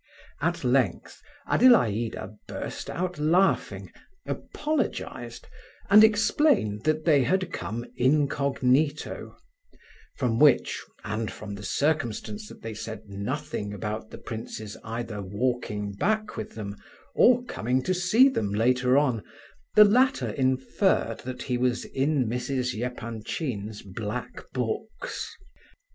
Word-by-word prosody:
At -, -, 0 dB
length -, -, 0 dB, 0.3 s
Adelaida 115 Hz, -, +3 dB
burst -, -, -6 dB
out 180 Hz, -2 st, -3 dB
laughing, 175 Hz, +6 st, +2 dB, 0.3 s
apologized, 305 Hz, +1 st, -3 dB, 0.5 s
and 210 Hz, +2 st, +9 dB
explained 220 Hz, -, +3 dB
that 155 Hz, 0 st, +1 dB
they 150 Hz, -5 st, +5 dB
had 185 Hz, +8 st, 0 dB
come 120 Hz, +2 st, -4 dB
incognito; 140 Hz, +1 st, +1 dB, 0.8 s
from 120 Hz, -4 st, 0 dB
which, 145 Hz, -4 st, +4 dB, 0.2 s
and 110 Hz, 0 st, -2 dB
from 100 Hz, -1 st, -8 dB
the 100 Hz, -, -7 dB
circumstance 145 Hz, -, -1 dB
that -, -, -13 dB
they 115 Hz, 0 st, -5 dB
said 110 Hz, 0 st, -7 dB
nothing 105 Hz, +1 st, -4 dB
about 105 Hz, +2 st, -4 dB
the -, -, -9 dB
prince's 110 Hz, -2 st, -7 dB
either 115 Hz, -2 st, -4 dB
walking 105 Hz, 0 st, -2 dB
back 215 Hz, -, 0 dB
with -, -, -6 dB
them 100 Hz, -2 st, -6 dB, 0.4 s
or 245 Hz, 0 st, +5 dB
coming 125 Hz, -, -1 dB
to 185 Hz, -, +1 dB
see 185 Hz, +9 st, +5 dB
them 230 Hz, -, -1 dB
later 125 Hz, +4 st, +3 dB
on, 130 Hz, -8 st, +2 dB, 0.5 s
the 210 Hz, -, +10 dB
latter 255 Hz, +6 st, +3 dB
inferred 130 Hz, -, +1 dB
that 130 Hz, 0 st, -6 dB
he 125 Hz, -2 st, -1 dB
was 125 Hz, -1 st, 0 dB
in 135 Hz, -1 st, +1 dB
Mrs. 125 Hz, +2 st, -1 dB
Epanchin's 115 Hz, -2 st, -4 dB
black 105 Hz, +4 st, -6 dB
books. 220 Hz, -, -4 dB
125 Hz, 115 wpm, -27 LUFS, 110-160 Hz, 0.8 s, the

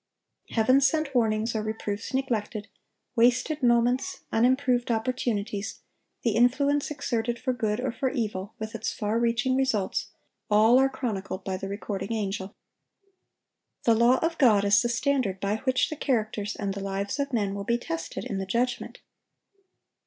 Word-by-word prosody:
Heaven 255 Hz, +4 st, +4 dB
sent 280 Hz, +1 st, +1 dB
warnings 225 Hz, -1 st, +1 dB
or 215 Hz, -, 0 dB
reproofs 215 Hz, -1 st, -4 dB
neglected, 225 Hz, -5 st, -2 dB, 0.5 s
wasted 250 Hz, +6 st, +3 dB
moments, 245 Hz, +7 st, +2 dB
unimproved 250 Hz, +1 st, +2 dB
opportunities, 220 Hz, -3 st, -2 dB, 0.4 s
the 235 Hz, -, +2 dB
influence 275 Hz, +6 st, +2 dB
exerted 240 Hz, -5 st, -2 dB
for 255 Hz, +1 st, -1 dB
good 220 Hz, -3 st, -1 dB
or 255 Hz, 0 st, -1 dB
for 260 Hz, +3 st, -1 dB
evil, 215 Hz, -5 st, -3 dB
with 220 Hz, -1 st, -6 dB
its 225 Hz, -1 st, -2 dB
far 215 Hz, +2 st, -1 dB
reaching 235 Hz, +2 st, +1 dB
results, 260 Hz, -8 st, 0 dB, 0.4 s
all 220 Hz, +4 st, +6 dB
are 270 Hz, 0 st, +4 dB
chronicled 200 Hz, -7 st, -4 dB
by 190 Hz, -, -2 dB
the 190 Hz, +1 st, -5 dB
recording 200 Hz, 0 st, -4 dB
angel. 200 Hz, -2 st, -3 dB, 1.3 s
The 230 Hz, -, +5 dB
law 235 Hz, +3 st, +5 dB
of 330 Hz, 0 st, -1 dB
God 215 Hz, -7 st, +5 dB
is 200 Hz, +1 st, +5 dB
the 240 Hz, -, 0 dB
standard 240 Hz, -5 st, 0 dB
by 200 Hz, +2 st, 0 dB
which 260 Hz, +4 st, +1 dB
the -, -, -2 dB
characters 215 Hz, -7 st, -1 dB
and 200 Hz, -2 st, -3 dB
the 200 Hz, -, -6 dB
lives 195 Hz, +5 st, -3 dB
of 280 Hz, 0 st, -1 dB
men 205 Hz, -5 st, 0 dB
will 200 Hz, 0 st, -4 dB
be 235 Hz, +3 st, +1 dB
tested 165 Hz, -8 st, -5 dB
in 195 Hz, -, -3 dB
the 190 Hz, -, -4 dB
judgment. 240 Hz, +5 st, -2 dB
230 Hz, 155 wpm, -27 LUFS, 205-255 Hz, 1.3 s, all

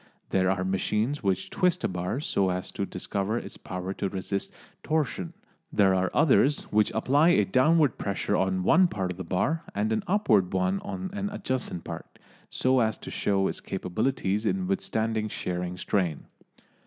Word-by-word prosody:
There 95 Hz, -1 st, +3 dB
are 95 Hz, -1 st, 0 dB
machines 105 Hz, +8 st, 0 dB
which 95 Hz, -4 st, -1 dB
twist 180 Hz, -2 st, +1 dB
a -, -, +3 dB
bar 90 Hz, +7 st, -2 dB
so 100 Hz, -10 st, +1 dB
as 90 Hz, 0 st, -3 dB
to 100 Hz, -, -3 dB
discover 100 Hz, +4 st, -2 dB
its -, -, -6 dB
power 90 Hz, +1 st, -5 dB
to 100 Hz, -, -2 dB
resist 100 Hz, +1 st, -3 dB, 0.3 s
torsion, 145 Hz, -, -1 dB, 0.4 s
there 100 Hz, -3 st, +4 dB
are 95 Hz, 0 st, +1 dB
others 145 Hz, -1 st, +3 dB
which 105 Hz, 0 st, +3 dB
apply 140 Hz, +9 st, +4 dB
a 105 Hz, -, +4 dB
downward 140 Hz, -, +3 dB
pressure 100 Hz, -1 st, -1 dB
on 95 Hz, -1 st, +1 dB
one 180 Hz, -, +5 dB
part 95 Hz, -, -2 dB
of 90 Hz, -, -9 dB
the -, -, -3 dB
bar 140 Hz, -, 0 dB
and 105 Hz, +2 st, +1 dB
an 110 Hz, -, -1 dB
upward 115 Hz, -, +3 dB
one 95 Hz, +1 st, +1 dB
on 95 Hz, -1 st, -5 dB
an 205 Hz, 0 st, -2 dB
adjacent 130 Hz, -, -3 dB
part, -, -, -8 dB, 0.3 s
so 130 Hz, 0 st, +2 dB
as 110 Hz, -2 st, +1 dB
to -, -, -9 dB
show 95 Hz, -1 st, +1 dB
its -, -, -4 dB
capabilities 105 Hz, +2 st, -1 dB
in 185 Hz, -, 0 dB
withstanding 115 Hz, -, -1 dB
shearing 90 Hz, -3 st, -3 dB
strain. 90 Hz, -5 st, -1 dB
100 Hz, 170 wpm, -27 LUFS, 95-130 Hz, 0.4 s, one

